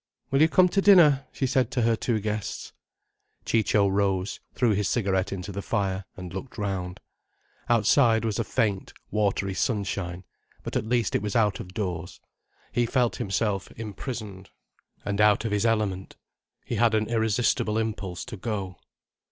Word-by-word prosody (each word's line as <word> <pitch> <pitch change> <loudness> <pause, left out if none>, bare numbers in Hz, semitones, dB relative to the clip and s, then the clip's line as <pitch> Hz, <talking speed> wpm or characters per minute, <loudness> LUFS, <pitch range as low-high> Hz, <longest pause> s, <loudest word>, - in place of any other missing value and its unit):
"Will 135 +1 +3
you 160 - +6
come 180 +3 +5
to 195 - +1
dinner?" 160 -9 +6
she 135 - -2
said 130 -2 +1
to 125 -3 0
her 115 0 +3
two 110 0 -1
guests. 105 0 -4 0.7
Ciccio 105 -2 +2
rose, 95 0 0 0.2
threw 120 -4 +2
his 105 -1 0
cigarette 95 -5 0
into 95 +1 -5
the 100 +1 -4
fire, 95 -1 -1
and 90 -2 -8
looked 95 +7 -7
round. 95 -3 -3 0.7
Outside 115 0 +4
was 110 -1 -1
a - - +1
faint, 105 -4 -1 0.2
watery 100 -2 0
sunshine: 95 -4 -2 0.4
but - - -6
at 110 - -1
least 120 -3 +1
it - - +1
was 105 -1 -3
out 105 -5 +2
of 95 -4 -9
doors. 90 -4 -4 0.5
He 120 -1 +1
felt 120 0 +1
himself 100 -1 -1
imprisoned 105 -3 -7 0.6
and 100 0 0
out 105 +1 +4
of 115 - -1
his 105 +2 +2
element. 105 -4 -1 0.5
He - - -3
had 115 -2 +3
an 110 0 +1
irresistible 110 -1 +1
impulse 105 -5 -3
to 110 - -8
go. 95 -3 -4
105 Hz, 160 wpm, -26 LUFS, 95-115 Hz, 0.7 s, you